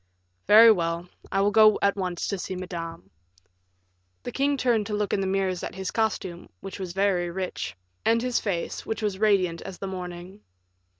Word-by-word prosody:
"Very 225 +2 +9
well; 170 -3 -1 0.2
I 195 - +2
will 205 +1 +3
go 215 0 +6
at 200 - +3
once 180 -3 -3
to 200 - -2
see 185 - -4
Madame." 170 -2 -7 1.1
The - - -5
king 280 +1 +1
turned 235 -5 +1
to 210 - -2
look 205 -1 -1
in 195 - +1
the 190 - -1
mirrors 190 -2 0
at - - -6
his 190 -1 -4
costume, 190 -6 -2
which 195 +1 -8
was 185 -2 -5
very 190 -2 +1
rich, 170 - -4 0.3
and 230 +1 +3
his 245 0 0
face, 180 -5 -3
which 220 0 -4
was 200 -3 -1
radiant 185 -6 +2
as 185 - -8
the - - -6
morning. 180 +1 -7
195 Hz, 185 wpm, -26 LUFS, 180-210 Hz, 1.1 s, Very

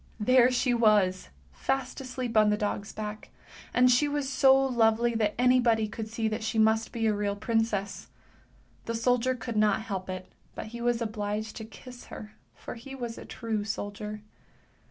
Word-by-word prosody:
There 255 +3 +5
she 250 0 +1
was, 210 -5 +3 0.2
fast 270 0 -2
asleep 255 -2 -5
on 215 -1 +5
the 210 - +2
dog's 205 -1 -3
back, 215 0 -6 0.4
and 250 0 +5
she 250 +4 +4
was 290 -1 -2
so 265 0 +5
lovely 235 -3 +2
that 215 -2 0
anybody 240 -3 +3
could 220 +1 -6
see 225 0 -2
that 220 +1 -3
she 220 +1 -2
must 220 +1 +3
be 225 -1 -2
a 215 - +3
real 205 -1 -1
princess! 210 -2 -1 0.8
The 230 - -3
soldier 250 +2 +1
could 235 -2 -5
not 215 +1 +3
help 195 -4 -5
it, 185 0 -6 0.2
but - - -5
he 235 - -6
was 240 -1 +1
obliged 215 0 -3
to 220 - -6
kiss 245 +2 -12
her, 210 0 -10 0.2
for - - -8
he 260 +3 -9
was 240 -3 -5
a - - -10
true 225 -3 -3
soldier. 210 +1 -5
225 Hz, 175 wpm, -28 LUFS, 210-245 Hz, 0.8 s, There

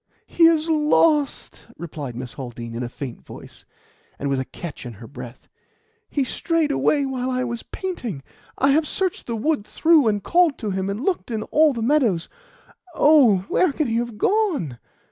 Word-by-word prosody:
"He 335 - +3
is 325 -1 +2
lost!" 300 -2 +1
replied 150 -7 -6
Miss 125 0 -6
Haldean 120 -3 -7
in 115 - -4
a 120 - -3
faint 125 -1 -7
voice, - - -12 0.5
and 140 - -3
with 135 - +1
a 130 - -2
catch 150 +5 -8
in 120 -2 -7
her 115 +3 -12
breath. 125 -1 -11 0.6
"He 285 - 0
strayed 320 +3 0
away 285 0 +2
while 260 -1 -2
I 255 0 -1
was 235 -2 -4
painting. 245 - -5 0.3
I 275 +1 +3
have 305 +2 +2
searched 375 -3 -2
the 235 - -2
wood 285 +1 0
through, 315 +3 +3
and 205 -2 0
called 345 -4 +3
to 215 -4 -3
him, 190 +1 -2
and 210 +8 -4
looked 380 -8 -1
in 220 -2 -2
all 310 +4 +3
the 235 -4 -3
meadows. 230 - +2 0.7
Oh! 250 -11 +5
where 365 - +2
can 305 +2 -1
he 230 -2 0
have 235 -2 -3
gone?" 320 - 0
240 Hz, 185 wpm, -22 LUFS, -, 0.7 s, Oh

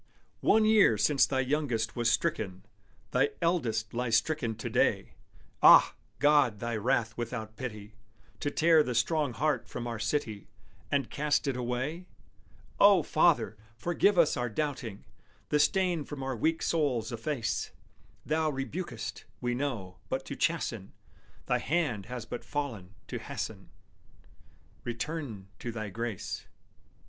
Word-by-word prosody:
One 220 0 +4
year 215 - +5
since 135 +7 +4
thy 130 -1 +1
youngest 125 -5 -1
was 120 -1 +2
stricken: 100 - -1 0.5
Thy 135 +3 +3
eldest 115 -11 0
lies 120 -1 +1
stricken 115 -2 -1
to 110 - -5
day. - - +1 0.5
Ah! - - +8 0.2
God, 145 -5 +4
was 105 - -17
Thy 120 +1 -2
wrath 110 0 0
without 115 -2 -5
pity, 105 -4 -7 0.5
To 145 - -1
tear 160 +1 +5
the 125 -4 -2
strong 145 +3 +1
heart 150 +6 0
from 120 - -5
our 115 -2 -4
city, 110 -2 -2 0.4
And 140 -4 0
cast 150 0 +1
it 135 - 0
away? 130 +8 -3 0.7
O 200 -4 +7
Father! 150 -9 +3 0.2
forgive 175 - +2
us 165 -3 +5
our 120 0 -1
doubting; 125 -5 -3 0.5
The 150 - +2
stain 180 -1 +2
from 145 -2 -7
our 135 -1 -2
weak 160 +8 0
souls 130 -9 0
efface; 115 +1 -2 0.6
Thou 155 +1 +1
rebukest, 150 +6 -5
we 120 0 -1
know, 120 -8 -3
but - - -2
to - - -5
chasten, - - -1 0.5
Thy - - +1
hand 140 - -1
has 125 -1 -6
but 120 - -6
fallen 115 -10 -4
to - - -5
hasten - - -6 1.1
Return 120 -5 -5
to 120 - -4
Thy 110 -2 -5
grace. 115 -1 -5
125 Hz, 140 wpm, -30 LUFS, 115-150 Hz, 1.1 s, Ah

